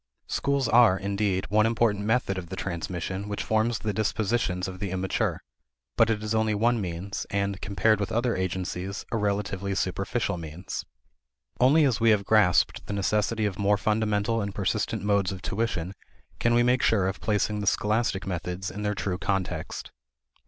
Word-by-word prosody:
Schools 140 -3 0
are, 115 -5 +6
indeed, 100 -1 -1
one 110 +1 +4
important 110 -3 +1
method 110 -3 +1
of 85 -2 -9
the - - -5
transmission 95 +2 -4
which 105 - -3
forms 110 +1 +1
the 105 -1 -3
dispositions 105 -3 0
of 95 -1 -7
the 100 - -3
immature; 95 0 -1 0.6
but 115 - +4
it 105 -1 0
is 110 +1 -2
only 110 -1 +2
one 115 +2 +2
means, 90 +2 -4
and, 100 0 -1
compared 105 +2 +2
with 100 - -2
other 120 +1 +1
agencies, 95 +1 -3
a 115 - 0
relatively 100 -2 -1
superficial 95 +2 -1
means. 80 +3 -6 0.7
Only 145 +5 +5
as 130 -4 +1
we 115 0 +4
have 105 -2 +3
grasped 105 -5 +3
the - - -3
necessity 105 +2 0
of 100 -2 -3
more 100 +1 +3
fundamental 110 +1 +1
and 100 -1 -4
persistent 100 0 -1
modes 100 -2 +2
of 95 -1 -7
tuition 95 -4 -2 0.5
can 115 0 +2
we 120 - +5
make 125 +1 +3
sure 100 -4 +3
of 95 - -4
placing 105 -1 0
the 100 - -3
scholastic 105 -1 +1
methods 90 +1 -4
in 105 - -6
their 105 0 -1
true 95 -2 -2
context. 95 -3 -3
100 Hz, 175 wpm, -27 LUFS, 95-110 Hz, 0.7 s, are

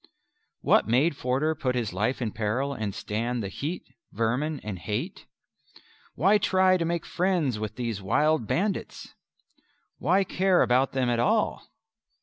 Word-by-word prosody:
What - - +3
made 135 +8 +2
Forder 135 +5 0
put 135 -5 -2
his 115 -6 -2
life 110 +7 -1
in 110 - -2
peril 115 +7 -1
and 105 -6 -4
stand 115 +2 -2
the 100 - -4
heat, 155 - -4 0.3
vermin, 125 +8 -1
and 100 -4 -5
hate? 105 +5 -4 0.9
Why 195 - +4
try 185 -1 +3
to 170 - -1
make 170 0 -2
friends 175 - 0
with 110 -1 -4
these 115 -5 -3
wild 145 +5 +1
bandits? 200 +1 -2 0.9
Why 185 +8 +3
care 185 0 +2
about 130 +2 +2
them 130 -2 0
at 120 -1 +1
all? 215 - +1
130 Hz, 145 wpm, -27 LUFS, 115-170 Hz, 0.9 s, Why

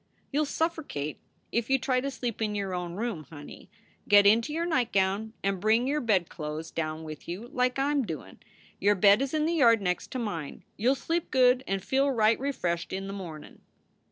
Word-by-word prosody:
"You 295 +2 +1
ll - - +1
suffercate 290 - -2 0.3
if 235 +1 -1
you 270 - +4
try 255 0 0
to 275 - -2
sleep 245 -5 -4
in 210 -1 -1
your 195 -2 -2
own 175 -1 -4
room, 205 -7 -3
honey. 145 -2 -11 0.4
Get 205 -1 +7
into 225 +7 +4
your 330 +2 -1
nightgown 220 - 0
and 195 -1 0
bring 220 +5 +3
your 295 +3 0
bedclo 170 -8 -1
es 160 - -9
down 155 0 -3
with 155 -2 -9
you, 195 +8 -6
like 250 0 0
I 275 +2 +1
m 290 -1 +2
doin. 145 - -7 0.4
Your 205 +1 +3
bed 200 +4 +5
is 275 -1 -1
in 305 0 +1
the 335 - +1
yard 235 -8 +5
next 180 -2 -2
to - - -2
mine. 175 - -5
You 245 +6 +2
ll - - -3
sleep 330 +6 -2
good 255 0 +4
and 195 -1 -2
feel 270 +1 +2
right 225 -3 +3
refreshed 180 -11 -2
in 195 +1 -3
the 195 - -5
mornin 170 -6 -9
." - - -42
220 Hz, 215 wpm, -28 LUFS, 180-265 Hz, 0.4 s, Get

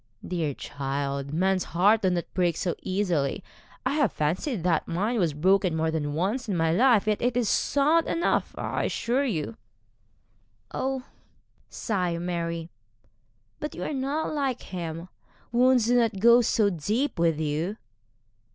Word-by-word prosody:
'Dear 160 -6 -2
child, 140 0 -4
men's 185 +3 +1
hearts 205 +5 +5
do 190 - +2
not 175 -1 0
break 175 -3 +1
so 175 - -1
easily. 180 -8 -1 0.4
I - - +1
have 290 -6 +2
fancied 175 - -1
that 170 -3 +1
mine 210 +8 -1
was 165 -6 +1
broken 185 +2 +2
more 160 0 0
than 145 -2 -2
once 215 +9 -1
in 190 - 0
my 165 -1 +2
life, 230 +3 +4
yet 215 -1 0
it 245 0 +1
is 240 -3 +1
sound 300 +9 +2
enough, 335 - 0
I - - -2
assure 255 +4 0
you.' 155 - -3 1.2
'Oh!' 265 -1 -2 0.7
sighed 180 -6 -2
Mary, 170 -1 -3 0.9
'but 300 - -5
you - - -5
are - - -3
not 280 +4 -2
like 275 -4 -1
him; 170 -1 -6 0.4
wounds 250 -1 +4
do 245 +2 +3
not 230 -5 +2
go 235 +3 +7
so 215 -3 +2
deep 210 - -1
with 165 -2 +2
you.' 160 +7 -2
185 Hz, 150 wpm, -26 LUFS, 165-240 Hz, 1.2 s, go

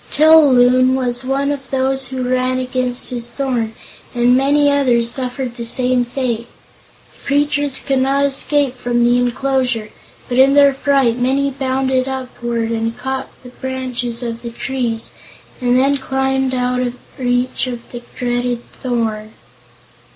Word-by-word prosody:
Til 310 +2 +4 0.2
Loon 255 +1 +4
was 245 -1 -1
one 275 +2 0
of 275 -2 -6
those 265 0 0
who 260 -1 -4
ran 255 0 0
against 255 -1 -2
his 240 -1 -2
thorn 240 -4 -2 0.4
and 245 +1 +4
many 285 +2 +3
others 245 -5 +3
suffered 255 -1 -2
the 235 - -6
same 250 +1 +3
fate. 240 -2 -3 0.7
The - - -18
creatures 290 -1 +1
could 270 -2 0
not 275 +2 +2
escape 280 -1 +1
from 240 -1 0
the 240 +1 +3
enclosure, 250 -2 -1 0.4
but 245 +1 0
in 270 +1 +5
their 280 -1 +6
fright 270 -3 +1
many 275 +3 +1
bounded 260 -1 -1
upward 240 -3 -3
and 225 0 -2
caught 265 0 -4 0.3
branches 250 -2 -3
of 230 -1 -5
the 235 - -6
trees, 235 -1 -3 0.5
and 245 0 +2
then 275 +2 +3
climbed 265 0 -1
out 250 0 0
of 245 -1 -2 0.2
reach 245 +1 0
of 240 -2 -7
the 240 - -7 0.2
dreaded 245 -1 -1
thorn. 220 -3 -3
255 Hz, 145 wpm, -17 LUFS, 245-265 Hz, 0.7 s, their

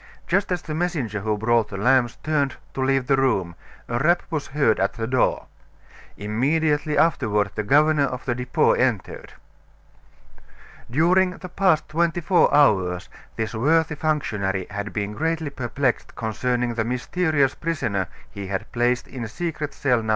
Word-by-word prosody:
Just 195 +2 0
as 180 -2 -1
the 155 0 -5
messenger 155 - -2
who 105 +1 -1
brought 115 0 +2
the 95 - -6
lamps 120 +2 +3
turned 145 -4 0 0.2
to 135 - -3
leave 135 -1 +1
the 135 - +3
room, 110 -10 +1 0.3
a 120 0 -1
rap 170 +6 +3
was 155 -3 -2
heard 135 -6 +1
at 100 0 +1
the 115 - -4
door. 125 +2 +1 0.7
Immediately 145 +8 0
afterward 105 - +2
the - - -2
governor 145 +6 +3
of 130 -1 -5
the 125 - 0
Depot 125 +1 +1
entered. - - -1 1.6
During 180 +7 +3
the 185 - -9
past 180 -3 +2
twenty 170 +2 0
four 175 +1 +3
hours 95 -11 +3 0.3
this 110 0 -3
worthy 160 +7 +2
functionary 105 - -1
had 100 +1 -4
been 105 0 -3
greatly 160 +3 -2
perplexed 130 0 -2
concerning 120 +2 -1
the 115 -1 -1
mysterious 135 +4 0
prisoner 120 - -2 0.2
he 100 +3 -7
had 95 0 -4
placed 120 +1 0
in 125 -3 -6
secret 150 +3 -4
cell 130 -4 +1
No. 110 - -5
130 Hz, 155 wpm, -23 LUFS, 110-155 Hz, 1.6 s, lamps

